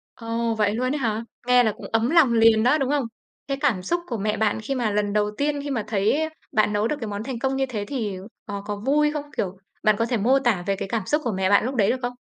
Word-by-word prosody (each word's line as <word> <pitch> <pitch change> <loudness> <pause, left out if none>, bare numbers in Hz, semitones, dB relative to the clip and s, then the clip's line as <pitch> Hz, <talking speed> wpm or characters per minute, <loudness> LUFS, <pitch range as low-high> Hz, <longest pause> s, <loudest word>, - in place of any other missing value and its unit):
Ồ, 230 0 -2
vậy 210 -1 +1
luôn 255 +4 0
ấy 295 - -1
hả? 225 -3 -1 0.2
Nghe 250 0 +6
là 220 - +2
cũng - - -10
ấm 225 +3 +2
lòng 315 -7 +5
liền 225 -1 +5
đó, 290 +6 +4
đúng 270 0 0
không? 290 -3 +1 0.4
Thế 275 - -1
cảm 245 -11 +1
xúc 345 - -1
của 235 - -3
mẹ 210 +1 -1
bạn 220 0 0
khi 240 +5 -3
mà 240 -5 0
lần 205 0 0
đầu 210 0 +1
tiên, 290 0 -1
khi 285 - -5
mà 225 -6 -1
thấy 220 +10 +1 0.2
bạn 215 -4 +2
nấu 210 +2 +1
được 300 - -1
cái 225 - -4
món 205 0 -4
thành 255 -2 -4
công 265 +2 -1
như 270 - +1
thế 210 -5 -3
thì, 220 -8 -3 0.3
ờ, 200 -1 -5
có 205 0 -4
vui 295 +2 +3
không? 300 -2 -3
Kiểu, 190 0 -2 0.3
bạn 215 -1 +4
có 230 - +1
thể 240 - 0
mô 245 +6 +3
tả 235 -9 +1
về 195 -1 0
cái 195 - -5
cảm 215 -2 -2
xúc 300 +1 +1
của 235 - 0
mẹ 190 0 0
bạn 200 +1 +5
lúc 260 +3 -2
đấy 210 -6 +3
được - - +1
không? 245 0 -2
230 Hz, 290 wpm, -24 LUFS, 210-270 Hz, 0.4 s, Nghe